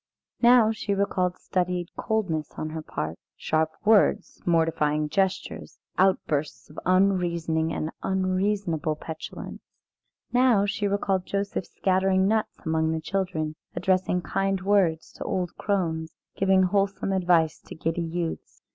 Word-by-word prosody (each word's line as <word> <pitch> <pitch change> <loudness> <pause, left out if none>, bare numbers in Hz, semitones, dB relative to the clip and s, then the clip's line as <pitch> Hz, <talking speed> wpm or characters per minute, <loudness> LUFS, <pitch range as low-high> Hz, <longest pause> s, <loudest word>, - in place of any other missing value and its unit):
Now 240 -2 +6
she 210 -2 -2
recalled 185 -2 0
studied 180 -1 -2
coldness 185 -9 -1
on 155 - -4
her 160 0 -4
part, 80 - -5 0.2
sharp 155 0 +1 0.2
words, 215 -1 +3
mortifying 155 -3 +2
gestures, 190 +4 -2 0.2
outbursts 155 -7 0
of 150 - -8
unreasoning 170 -4 +2
and 155 0 -3
unreasonable 185 -4 0
petulance. 160 +1 -8 0.7
Now 245 -5 +4
she 205 0 -1
recalled 195 -2 0
Joseph 200 -2 -2
scattering 190 0 +2
nuts 220 +1 0
among 160 0 +1
the 160 - -1
children, 165 -3 -2 0.2
addressing 185 -1 +1
kind 195 +4 0
words 190 -5 +2
to - - -5
old 180 -2 -2
crones, 165 -5 -1 0.2
giving 190 -1 +3
wholesome 195 +1 0
advice 175 -4 +2
to - - -11
giddy 165 +2 -2
youths. 165 - -4
180 Hz, 125 wpm, -26 LUFS, 160-195 Hz, 0.7 s, Now